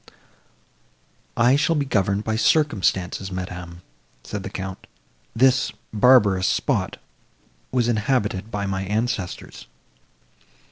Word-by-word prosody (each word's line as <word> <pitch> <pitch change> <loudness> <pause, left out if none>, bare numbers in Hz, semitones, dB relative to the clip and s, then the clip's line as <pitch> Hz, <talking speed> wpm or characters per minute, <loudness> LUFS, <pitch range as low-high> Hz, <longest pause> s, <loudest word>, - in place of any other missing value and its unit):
"I 125 +3 +5
shall 150 +3 +2
be 145 -2 0
governed 100 -4 0
by 110 0 -1
circumstances, 95 - +1
madam," 90 -1 -7 0.4
said 105 - -5
the 100 - -6
Count, 95 -1 -7 0.5
"this 130 +2 +3 0.2
barbarous 105 -5 +5
spot - - 0 0.7
was 120 -2 +1
inhabited 105 -3 0
by 105 -2 -3
my 95 -1 -2
ancestors." 105 -1 -3
105 Hz, 100 wpm, -23 LUFS, 95-120 Hz, 0.7 s, I